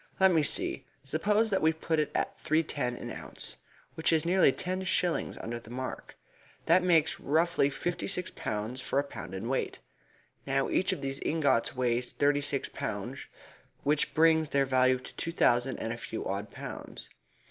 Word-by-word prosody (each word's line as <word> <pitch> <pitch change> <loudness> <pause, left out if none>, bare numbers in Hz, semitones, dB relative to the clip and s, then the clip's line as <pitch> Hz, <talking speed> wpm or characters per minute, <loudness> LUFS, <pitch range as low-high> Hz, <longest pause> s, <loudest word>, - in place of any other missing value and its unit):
"Let 190 0 +6
me 160 - +4
see. 145 - -1 0.2
Suppose 205 +10 +1
that 195 - +2
we 160 - +5
put 160 0 -1
it 150 - +1
at - - 0
three 155 +2 +2
ten 125 -6 -2
an - - -6
ounce, - - -6 0.4
which 160 0 +2
is 160 0 +2
nearly 180 -4 +5
ten 185 +5 -3
shillings 180 -2 0
under 120 +1 -5
the 115 - -15
mark. 130 +2 -6 0.5
That 175 +3 +5
makes, 165 -4 +3
roughly, 160 -1 +2
fifty 175 +5 -3
six 180 -2 -2
pounds 110 +4 -4
for 135 - -2
a 140 - +4
pound 105 -9 -8
in 95 +5 -4
weight. 135 +1 -1 0.7
Now 135 0 +1
each 190 +2 +2
of 185 - -3
these 135 0 -3
ingots 140 -7 +1
weighs 125 -1 0
thirty 145 0 +2
six 140 -1 -2
pounds, - - -5 0.6
which 145 +1 +1
brings 160 -1 +4
their 140 -1 +2
value 130 -1 +3
to 125 - -12
two 165 - -3
thousand 125 -5 +2
and 115 +1 -3
a - - -6
few 115 - -5
odd 100 +2 -3
pounds. - - -8
145 Hz, 180 wpm, -30 LUFS, 125-165 Hz, 0.7 s, Let